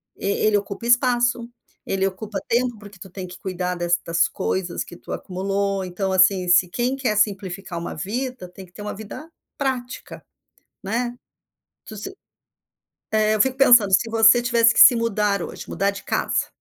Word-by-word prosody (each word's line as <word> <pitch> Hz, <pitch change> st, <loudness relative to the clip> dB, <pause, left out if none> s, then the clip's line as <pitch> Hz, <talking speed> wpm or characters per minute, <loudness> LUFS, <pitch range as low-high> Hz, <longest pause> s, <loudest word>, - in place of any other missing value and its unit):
e -, -, -8 dB
ele 205 Hz, +1 st, +1 dB
ocupa 200 Hz, +2 st, -6 dB
espaço, 245 Hz, -1 st, +2 dB, 0.3 s
ele 195 Hz, 0 st, -1 dB
ocupa 195 Hz, +2 st, -4 dB
tempo, 240 Hz, 0 st, 0 dB
porque 205 Hz, -2 st, -14 dB
tu 190 Hz, -, -11 dB
tem 185 Hz, +1 st, -7 dB
que 180 Hz, -, -12 dB
cuidar 180 Hz, -1 st, -3 dB
destas 175 Hz, -1 st, 0 dB
coisas 180 Hz, -2 st, -3 dB
que -, -, -12 dB
tu -, -, -12 dB
acumulou. 195 Hz, +1 st, -2 dB
Então, 185 Hz, +1 st, -3 dB
assim, 185 Hz, 0 st, +3 dB
se 180 Hz, +1 st, +4 dB
quem 245 Hz, +7 st, -1 dB
quer 250 Hz, -6 st, -1 dB
simplificar 195 Hz, -3 st, -1 dB
uma 170 Hz, -, -6 dB
vida, 235 Hz, -, -4 dB
tem 185 Hz, +2 st, -12 dB
que -, -, -25 dB
ter 205 Hz, -, -10 dB
uma 210 Hz, -, -4 dB
vida 220 Hz, +9 st, -9 dB, 0.3 s
prática, 255 Hz, -3 st, -4 dB, 0.6 s
né. 240 Hz, +5 st, -2 dB, 0.7 s
Tu 215 Hz, -, -10 dB
se 210 Hz, -, -7 dB, 1.0 s
é, 215 Hz, 0 st, +2 dB
eu 210 Hz, -, +3 dB
fico 265 Hz, +2 st, +1 dB
pensando, 240 Hz, -7 st, +6 dB
se 225 Hz, +5 st, +3 dB
você 225 Hz, +1 st, +5 dB
tivesse 235 Hz, -1 st, +3 dB
que -, -, +4 dB
se 245 Hz, -, +9 dB
mudar 210 Hz, -4 st, 0 dB
hoje, -, -, -7 dB
mudar 200 Hz, +1 st, 0 dB
de 200 Hz, -, -10 dB
casa, -, -, -1 dB
205 Hz, 175 wpm, -22 LUFS, 190-235 Hz, 1.0 s, se